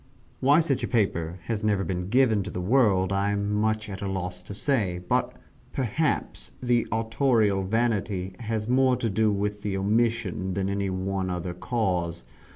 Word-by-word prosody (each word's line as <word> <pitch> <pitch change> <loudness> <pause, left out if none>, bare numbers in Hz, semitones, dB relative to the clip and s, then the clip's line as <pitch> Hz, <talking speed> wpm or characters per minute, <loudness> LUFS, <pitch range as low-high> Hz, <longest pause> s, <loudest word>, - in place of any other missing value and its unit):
Why 145 +5 +5
such 145 -5 0
a - - 0
paper 90 -7 0
has 110 -2 -3
never 105 -2 +2
been 90 +1 -3
given 120 -3 +4
to - - -5
the - - -5
world, 100 -3 +3
I 100 +1 +1
am 100 0 -1
much 110 0 0
at 95 -2 -7
a 100 - -2
loss 90 -1 -4
to 90 +2 -9
say 100 -6 0
but, 90 0 0 0.4
perhaps, 140 +4 -1
the 120 -2 +1
autorial 110 -3 +2
vanity 100 -3 -1
has 110 -2 -2
had 120 - 0
more 130 -1 +4
to 115 -3 -2
do 110 +2 +2
with 105 +1 -2
the 100 -2 -2
omission 105 -2 0
than 95 0 -1
any 100 0 -1
one 95 0 -2
other 90 0 -3
cause. 90 -4 -1
105 Hz, 175 wpm, -26 LUFS, 95-115 Hz, 0.4 s, Why